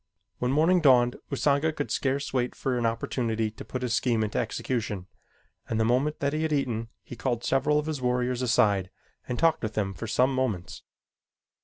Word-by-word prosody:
When 125 - 0
morning 165 +5 +4
dawned 125 -4 +5
Usanga 145 +2 +2
could 145 -2 -4
scarce 140 0 -1
wait 125 -1 0
for 130 -2 -1
an 120 -1 +1
opportunity 115 -1 -1
to 110 - -10
put 130 -1 -5
his 120 -2 -1
scheme 115 -2 +2
into 105 - -1
execution, 105 -7 -2 0.6
and 115 - 0
the 110 - +3
moment 130 +6 +1
that 140 0 0
he 155 - -1
had 160 -1 0
eaten, 120 -6 -1
he - - -9
called 120 +2 -2
several 135 +3 +2
of 150 - 0
his 155 -4 -3
warriors 125 0 0
aside 105 -6 +2 0.4
and 125 - -3
talked 165 +3 +3
with 110 -1 -4
them 100 -2 -1
for 115 - -6
some 125 +5 +2
moments. 120 -9 -2
125 Hz, 190 wpm, -27 LUFS, 115-140 Hz, 0.6 s, dawned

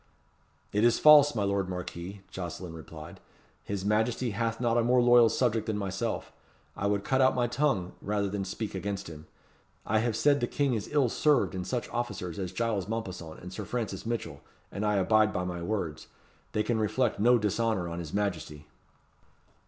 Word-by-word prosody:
"It 105 +2 +2
is 120 0 +5
false, 145 -3 +7
my 105 - 0
lord 100 -1 0
Marquis," 90 +2 -6
Jocelyn 90 -1 -6
replied. 80 -1 -10 0.4
"His 100 -1 -4
Majesty 110 +3 +1
hath 115 +2 -2
not 120 -1 +1
a 120 - +3
more 125 +2 +4
loyal 120 -1 +6
subject 115 -3 0
than 110 -2 -1
myself. 100 +3 -3 0.4
I 100 - -1
would 100 -1 0
cut 135 0 +1
out 130 0 +4
my 125 -1 +2
tongue 120 -7 0
rather 105 0 -1
than 100 0 -3
speak 100 +3 -5
against 100 +1 -4
him. 80 -1 -11 0.6
I 110 +1 +2
have 115 0 0
said 145 +5 +3
the 120 - 0
King 140 -1 0
is 110 -3 -2
ill 145 -4 +3
served 145 -1 +2
in 90 -1 -4
such 125 -2 -2
officers 100 -7 -4
as 90 -2 -3
Giles 105 -2 -1
Mompesson 95 -8 -5
and 90 +1 -8
Sir 105 - -5
Francis 110 -3 -4
Mitchell, 100 -11 -4 0.3
and 100 - -4
I 105 0 +2
abide 105 +3 +3
by 90 - -2
my 90 -1 -4
words. 85 -5 -3 0.5
They 105 - +1
can 115 -1 0
reflect 110 +2 0
no 120 +3 +5
dishonour 105 -3 0
on 85 0 -5
his 80 -3 -6
Majesty." 85 -7 -3
105 Hz, 185 wpm, -29 LUFS, 95-120 Hz, 0.6 s, false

